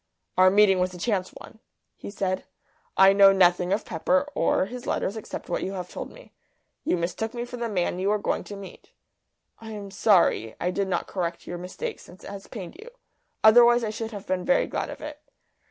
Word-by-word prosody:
"Our 185 0 +6
meeting 195 -1 +5
was 180 0 -1
a - - -8
chance 185 -1 -1
one," 220 - -14 0.4
he - - -9
said. 190 -2 -2 0.5
"I 195 +1 +7
know 195 0 +7
nothing 180 -1 +3
of 205 +2 0
Pepper 185 - 0
or - - +1
his 245 +4 -8
letters 200 - -1
except 220 - -7
what - - -2
you 195 - -3
have 180 -2 -5
told - - -6
me. - - -16 0.5
You - - +1
mistook 200 +7 -3
me 240 0 -3
for 245 0 -8
the 235 -1 -3
man 180 -3 -1
you 190 +2 0
were 210 - +2
going 205 - -2
to 205 - -8
meet. 195 -1 -12 0.7
I 225 - -10
am 200 -2 -8
sorry 185 - +3
I 180 - 0
did 200 +1 -1
not 190 - -1
correct 175 -3 -4
your 175 - -6
mistake 430 - -6
since 180 - -15
it - - -8
has 200 -1 -9
pained 190 -7 -8
you. 460 - -11 0.5
Otherwise 240 +2 +7
I 215 - -1
should 225 +1 -5
have 205 -3 -8
been 185 -1 -1
very 270 - +3
glad - - -3
of - - -9
it." 300 -1 -7
195 Hz, 215 wpm, -25 LUFS, 185-220 Hz, 0.7 s, I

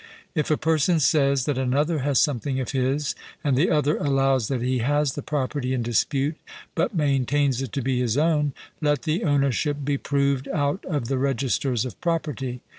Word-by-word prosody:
If 150 -4 -1
a 155 - +3
person 160 +1 +2
says 140 -3 +3
that 140 -3 -1
another 145 +5 +1
has 140 0 +1
something 135 -2 0
of 130 - -3
his, 135 +2 0 0.3
and 140 -4 +2
the 150 +8 +3
other 150 -1 +2
allows 135 -4 +1
that 130 -3 -2
he 130 0 0
has 145 +3 +1
the 145 - -5
property 135 -2 -2
in 120 - -1
dispute, 135 +6 0 0.4
but 170 +5 -1
maintains 140 -3 +1
it 130 -5 -4
to 135 - -2
be 130 -1 0
his 125 0 0
own, 150 -2 +2 0.3
let 145 -1 +1
the 160 +2 -1
ownership 145 0 +1
be 140 -1 0
proved 140 -1 0
out 145 +2 -1
of 145 -9 -2
the 135 0 -1
registers 130 -2 0
of 125 - -8
property. 145 -7 -2
140 Hz, 185 wpm, -24 LUFS, 130-150 Hz, 0.4 s, a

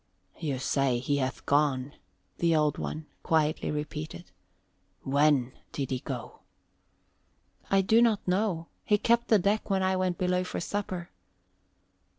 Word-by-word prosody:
"You 145 -5 -2
say 130 -1 +1
he 135 +4 0
hath 130 -1 -2
gone," 140 -2 +1 0.5
the 170 -1 +3
Old 150 -1 +2
One 155 0 -4 0.2
quietly 155 -1 +1
repeated. 150 - -5 0.7
"When 140 -2 +3 0.2
did 135 -2 -3
he 130 - 0
go?" - - -6 1.3
"I 195 0 +4
do 220 +5 +4
not 225 -5 +2
know. 180 -3 0 0.2
He 210 - +3
kept 235 +3 +2
the 220 - +6
deck 205 +4 0
when 190 -1 +2
I 190 0 +2
went 185 -1 0
below 180 0 +1
for 185 - -4
supper." 185 -2 -4
160 Hz, 140 wpm, -29 LUFS, 140-190 Hz, 1.3 s, the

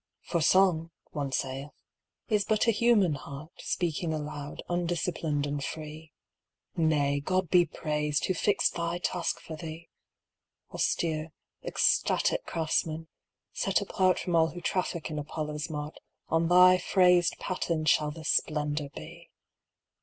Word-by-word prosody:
For 170 - -1
Song, 170 -1 +4 0.2
one 140 -2 -3
saith, 135 +2 -3 0.6
is 210 -2 +2
but 215 +1 +1
a 230 - +5
human 210 -6 +3
heart 145 +3 -8
Speaking 165 -1 -2
aloud, 150 -1 -6
undisciplined 170 -4 -1
and 145 -1 -3
free. 155 0 -7 0.6
Nay, 145 -3 +2
God 185 +4 -1
be 175 -1 +5
praised, 150 -1 -1
Who 185 - +1
fixed 200 +4 +1
thy 170 0 -2
task 175 -1 -2
for 160 - -8
thee! 165 +1 -8 0.8
Austere, 160 -1 -1 0.3
ecstatic - - +1
craftsman, 160 0 -1 0.4
set 195 - +1
apart 190 -2 +1
From 175 -2 -2
all 160 -1 +5
who 165 +2 -7
traffic 175 -3 -2
in 150 - -3
Apollo's 150 +1 -4
mart, 150 0 -5 0.3
On 165 +1 +2
thy 180 +1 +7
phrased 180 -1 +3
paten 170 -4 -2
shall 150 -1 +4
the 160 +2 -8
Splendour 150 -1 0
be! 170 +2 -10
165 Hz, 130 wpm, -29 LUFS, 150-180 Hz, 0.8 s, thy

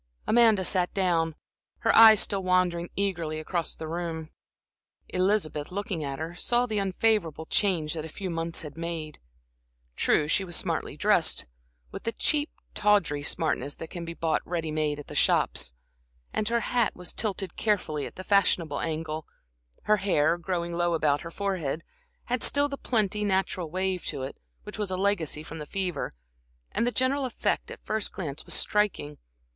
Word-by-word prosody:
Amanda 220 -4 +5
sat 180 -2 +2
down, 165 -4 +1 0.5
her - - +3
eyes 220 -2 +9
still 200 -1 0
wandering 180 -2 +1
eagerly 170 -6 -1
around 170 +1 -2
the 160 - -6
room. 165 -1 -4 0.8
Elizabeth, 185 -5 0
looking 195 -4 -3
at 140 -1 -3
her, 160 +3 -5
saw 240 +7 +1
the 215 -3 -1
unfavorable 190 -5 +1
change 170 -6 +2
that 160 -2 -3
a 160 - -7
few 185 +3 -5
months 165 0 -2
had 150 -2 -8
made. 165 -2 -5 0.8
True, 150 - +3
she 190 - +2
was 175 -2 -4
smartly - - -2
dressed, - - +2 0.5
with - - -6
the 230 - -2
cheap, 295 +5 +2 0.2
tawdry 200 -9 +2
smartness 145 -2 0
that 165 - -8
can 175 - -5
be 170 0 -6
bought 160 -1 0
ready 165 -2 -3
made 155 -1 0
at 145 - -8
the - - -10
shops, - - +2 0.6
and 215 0 0
her 235 0 +2
hat 240 -2 +1
was 180 -1 -3
tilted 200 -3 -2
carefully 170 -9 0
at - - -13
the 185 - -7
fashionable 180 -7 +2
angle; 160 -1 -3 0.6
her 215 - +4
hair, 170 -5 +2
growing 175 -1 -3
low 175 0 +1
about 145 -2 +2
her 165 - -7
forehead, 170 -5 -2 0.4
had 245 0 -2
still 285 0 +3
the 280 - -4
pretty, 210 -6 0
natural 190 -4 0
wave 185 +1 -1
to 140 -4 -3
it, 135 - -5 0.3
which - - -7
was 205 -2 -1
a 185 - -1
legacy 185 -6 0
from 160 +1 -8
the 150 - -7
fever, 185 - -3 0.6
and 235 - +1
the - - +2
general 260 +3 +2
effect 255 - -1
at - - -7
a - - -39
first 215 -1 0
glance 150 -6 -5
was - - +2
striking. 200 -8 0
175 Hz, 175 wpm, -28 LUFS, 160-205 Hz, 0.8 s, eyes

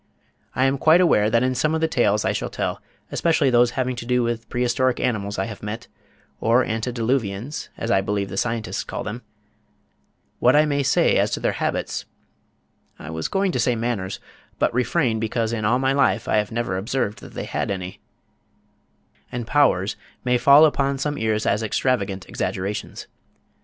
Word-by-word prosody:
I 130 - +2
am 135 0 +1
quite 160 +4 +5
aware 110 -12 +4
that 115 +2 +2
in 130 0 +1
some 155 +5 +1
of 160 - -1
the 160 - +3
tales 105 -8 +2
that - - +1
I - - +2
shall - - -3
tell, - - -3 0.3
especially 160 -5 +2
those 120 0 +5
having 130 -1 0
to 120 - -6
do 125 -1 +2
with 115 -1 -3
Prehistoric 125 +1 +1
Animals 105 -5 -1
I 95 - 0
have 110 -3 -8
met, 105 +3 -5 0.5
or 115 +3 +3
Antediluvians 115 +1 -2
as 115 - -2
I 95 - +4
believe 100 0 -2
the 95 - -7
Scientists 115 +1 -2
call - - -5
them, - - -5 1.2
what 125 +3 +4
I 150 +1 +5
may 145 -1 0
say 130 -1 +3
as - - +2
to - - -1
their - - +1
habits - - -2 0.9
I 75 - -8
was 80 0 -3
going 195 -1 0
to - - -2
say 125 - +2
manners, 110 -5 -3 0.4
but - - +1
refrain 125 -1 +1
because 110 +1 -1
in 110 -2 -2
all 120 +4 +3
my 135 +1 +1
life 135 -5 +2
I - - +2
have 105 +1 0
never 115 -5 -2
observed 105 -1 -2
that - - -13
they - - -4
had - - -2
any 95 -1 -5 1.3
and 120 -1 -4
powers 110 -9 +2 0.3
may 125 0 +2
fall 140 +4 +7
upon 140 -2 +1
some 145 +2 -2
ears 110 -3 -1
as 105 +2 +1
extravagant 105 -4 -1
exaggerations. 100 +3 -4
120 Hz, 185 wpm, -23 LUFS, 105-130 Hz, 1.3 s, fall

